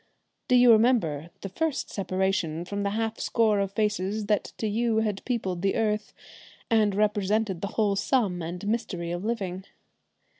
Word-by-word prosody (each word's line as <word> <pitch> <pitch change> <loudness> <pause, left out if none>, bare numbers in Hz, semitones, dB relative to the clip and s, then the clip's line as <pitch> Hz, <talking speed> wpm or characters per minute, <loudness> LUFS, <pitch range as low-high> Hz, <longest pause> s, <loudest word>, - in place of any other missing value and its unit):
Do 250 - +4
you 245 -1 +7
remember 215 - +3
the 195 - -5
first 310 - -2
separation 185 -4 -1
from 200 +2 -4
the 200 - 0
half 225 +2 -2
score 220 -3 +2
of 195 0 -1
faces 210 0 -1
that 210 0 +1
to - - -3
you 225 +1 +1
had 210 -3 -2
peopled 190 -8 -2
the 195 0 +1
earth 210 -2 0 0.6
and 215 -3 +3
represented 210 -2 +1
the 200 - -2
whole 210 -3 +2
sum 195 -5 +1
and 175 +4 -5
mystery 190 -6 -2
of 175 +2 -4
living? 195 -5 -3
205 Hz, 160 wpm, -27 LUFS, 190-220 Hz, 0.6 s, you